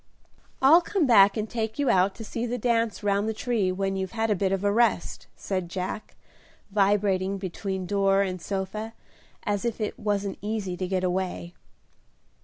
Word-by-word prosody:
"I'll 315 +6 +8
come 350 -1 0
back 200 -5 +6
and 215 0 -1
take 220 -1 -3
you 285 -3 +2
out 190 +1 +3
to 225 - -8
see 235 +3 -3
the 245 +1 -2
dance 230 -2 0
round 205 +1 +1
the 220 - -3
tree 215 -5 0
when 195 +1 -1
you've 190 +2 -3
had 225 -1 0
a - - +3
bit 190 0 0
of 195 0 -1
a 205 - +3
rest," 220 -5 +1
said 185 -3 -3
Jack, 185 +4 -5 0.6
vibrating 195 -1 +2
between 190 0 -4
door 195 +1 +2
and 185 -2 -4
sofa 200 +4 -4 0.5
as 205 -1 -1
if 235 -1 -2
it 215 - -3
wasn't 205 -2 -2
easy 205 -3 -3
to 185 0 -3
get 185 0 -1
away. 180 -1 -2
200 Hz, 180 wpm, -26 LUFS, 190-220 Hz, 0.6 s, I'll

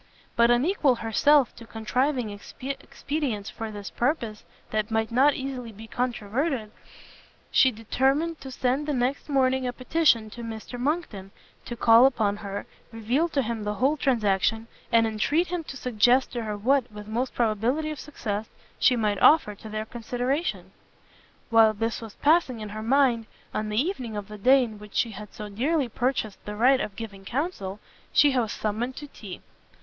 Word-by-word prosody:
But 235 0 +5
unequal 270 +2 +3
herself 250 +5 +3
to 230 - -11
contriving 250 +2 -1 0.3
expedients 270 -4 -4
for 225 0 -5
this 205 -2 -7
purpose 235 -5 -1 0.3
that 215 0 -1
might 220 0 0
not 275 +4 +4
easily 260 -3 -5
be 220 +1 -11
controverted, 240 +1 -2 0.8
she 260 - +6
determined 270 +8 0
to 265 - -7
send 260 +3 -1
the 295 - 0
next 255 +4 -1
morning 260 -2 +2
a - - -1
petition 250 -4 +2
to 240 - -8
Mr 230 +2 -7
Monckton 250 - -2 0.4
to 240 - -5
call 230 +2 +7
upon 210 -6 0
her, 200 -1 -5 0.3
reveal 240 +9 0
to 280 -4 0
him 230 -1 -3
the 210 0 -2
whole 270 +7 +2
transaction, 225 -5 +1 0.3
and 230 0 +5
entreat 285 +11 +1
him 350 -2 -2
to 275 - -7
suggest 250 +1 +3
to 240 -2 -4
her 210 -1 -3
what, 255 +3 +1
with 210 0 -9
most 240 +4 -2
probability 240 +7 0
of 300 - -6
success, 220 -7 -4 0.3
she 250 - +5
might 210 -4 0
offer 300 -9 +6
to 215 +2 -11
their 215 0 -3
consideration. 245 +7 -3 0.8
While 225 -1 +6
this 225 +2 -2
was 225 -3 -9
passing 290 -6 +2
in 215 -1 -6
her 215 +1 -6
mind, 240 -1 +2 0.3
on 215 0 -2
the 210 +1 0
evening 255 - -2
of 205 -1 -6
the 210 0 -9
day 260 +5 +5
in 220 -3 -6
which 210 -1 -13
she 230 - +1
had 210 0 -9
so 210 - -7
dearly 260 +6 0
purchased 240 -3 -2
the 210 - -6
right 255 +5 +4
of 200 - -4
giving 205 -3 -8
counsel, 215 - -3 0.3
she 285 -2 +5
was 230 -4 +1
summoned 225 +4 -2
to 295 - -7
tea. 205 -9 -10
235 Hz, 175 wpm, -26 LUFS, 215-270 Hz, 0.8 s, call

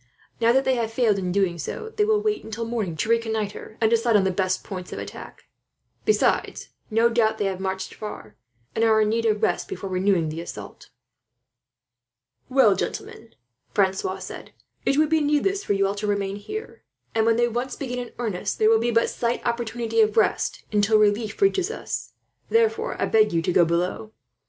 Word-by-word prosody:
Now 230 0 +4
that 265 +2 +3
they 265 - +3
have 225 -1 -1
failed 225 -4 +2
in 180 -1 -2
doing 180 -3 +1
so, 440 - -5
they 420 -1 +3
will 430 0 +3
wait 425 0 -1
until 225 +1 -5
morning 215 -8 -3
to 155 - -1
reconnoitre, 220 -2 -2
and 220 -1 +2
decide 230 0 +3
on 205 - +5
the 190 - +1
best 185 0 -1
points 185 -3 -7
of - - -6
attack. - - -9 0.6
Besides, 430 - +1 0.2
no 225 +1 +4
doubt 225 -2 +2
they 205 - -1
have 190 -1 -2
marched 190 0 -3
far, 160 - -8 0.4
and 225 - 0
are 220 -1 +4
in 210 - +2
need 230 +1 +1
of 215 -1 0
rest - - +1
before 195 - -6
renewing 185 -3 +1
the 160 +2 -5
assault." 170 - -9 1.6
"Well, 255 -7 +5
gentlemen," 225 +3 -6 0.4
Francois 190 -1 +1
said, 185 - -9 0.3
"it 275 - +3
would 305 0 +3
be 320 -1 +3
needless 300 +7 +1
for - - 0
you 195 0 +2
all 195 - 0
to 205 +1 -4
remain 200 -1 -1
here; 425 - -7 0.3
and 225 - +2
when 230 - +4
they 240 +1 +3
once 240 +2 -3
begin 250 -3 -4
in 245 -1 -6
earnest, 220 -7 -2
there 215 - +4
will 225 - +5
be 235 +1 0
but 230 0 +3
slight 235 0 -2
opportunity 235 -1 0
of 215 0 +2
rest 220 - +1
until 210 +1 +3
relief 210 +1 +1
reaches 390 -1 +2
us. 460 - -5 0.4
Therefore, 450 0 +1
I - - +2
beg 215 -1 +3
you 165 -1 +1
to 180 - 0
go 175 - +5
below. 180 +6 -2
220 Hz, 195 wpm, -24 LUFS, 195-240 Hz, 1.6 s, on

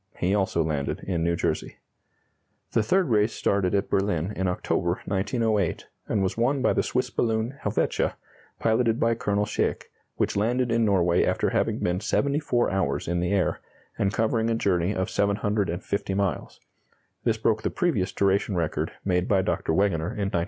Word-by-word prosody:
He 90 +2 +1
also 95 -5 +1
landed 75 -3 -2
in 85 -4 -2
New 85 0 +1
Jersey. - - -2 0.9
The - - +2
third 180 - +2
race 105 0 +2
started 100 -1 +1
at 100 - 0
Berlin 95 -1 0
in 95 +1 -1
October, 90 -1 -1
1908, 105 -1 0 0.2
and 100 - +1
was 95 - -1
won 125 +4 +1
by - - +3
the - - +2
Swiss 125 - -1
balloon 110 +2 0
"Helvetia," 105 +1 0 0.4
piloted 115 0 +1
by 115 0 +3
Colonel 105 -2 0
Schaeck, - - -2 0.2
which - - 0
landed 120 +4 +1
in 115 0 +2
Norway 90 -4 +3
after - - +1
having - - +1
been 90 +1 0
74 140 +1 +1
hours 95 0 -1
in 85 +1 0
the 90 +2 -1
air, 100 -3 +1 0.4
and 95 - 0
covering 115 +1 +1
a 115 - +1
journey 95 -2 +1
of 95 - -1
750 100 -2 -1
miles. 100 -6 -2 0.6
This 115 -2 +1
broke 110 0 +1
the - - -1
previous 125 - 0
duration 100 0 +1
record 85 -3 -1
made 90 -1 +1
by 95 -2 +3
Dr. - - -1
Wegener 85 -1 0
in 100 -1 -2
1905. 85 - +2
100 Hz, 170 wpm, -26 LUFS, 90-115 Hz, 0.9 s, by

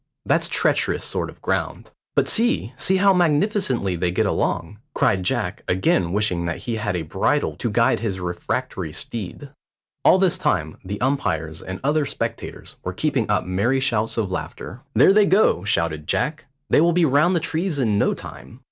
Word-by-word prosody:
"That's - - +2
treacherous - - +1
sort - - -2
of - - -15
ground." - - -2 0.2
"But - - +2
see, 230 - +1
see 190 +8 +2
how 195 0 +5
magnificently 155 - +1
they 90 +1 0
get 90 - 0
along," 85 +5 -1 0.2
cried 95 - +2
Jack, 105 -2 -1
again 90 -1 +1
wishing 95 -4 0
that 85 - -4
he 115 -2 -2
had 105 -3 -2
a 85 - -2
bridle 95 - 0
to 120 - -2
guide 115 +4 +2
his 100 -5 -3
refractory 90 -1 -3
steed. 115 +6 -6 0.5
All - - +6
this 185 -1 +2
time 80 - -1
the 100 +2 -5
umpires 80 - -1
and 95 0 -6
other 145 +1 +1
spectators - - -5
were - - -4
keeping - - -1
up - - +1
merry 100 +9 +1
shouts 115 -5 0
of 105 -5 -1
laughter. 115 +5 -6
"There 195 - +6
they 210 0 +5
go," 190 - +3
shouted 80 -6 0
Jack; 155 -1 -1 0.2
"they - - +4
will 170 +1 +3
be 175 -1 +3
round 155 +6 +3
the - - +3
trees 165 +1 -2
in 110 -6 +1
no - - +2
time." 115 - -11
115 Hz, 180 wpm, -22 LUFS, 95-155 Hz, 0.5 s, All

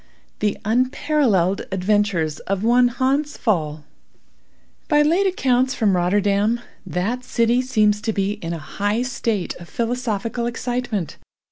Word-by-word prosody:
THE 210 -1 0
UNPARALLELED 235 - +1
ADVENTURES 190 -5 +1
OF 195 +1 -3
ONE 245 +2 +5
HANS 265 +5 0
PFAAL 175 - +1
(*1) 150 - -39
By 295 -2 +4
late 345 +6 +3
accounts 260 -8 +1
from 205 -4 +2
Rotterdam, 200 +5 +2 0.3
that 195 +9 -2
city 235 0 +2
seems 215 -5 +2
to 225 - -1
be 200 -1 0
in 165 - -4
a 170 - -3
high 205 +8 -2
state 230 -6 -2
of 175 -1 -12
philosophical 235 -1 -2
excitement. 240 - -3
220 Hz, 130 wpm, -21 LUFS, 195-250 Hz, 0.3 s, ONE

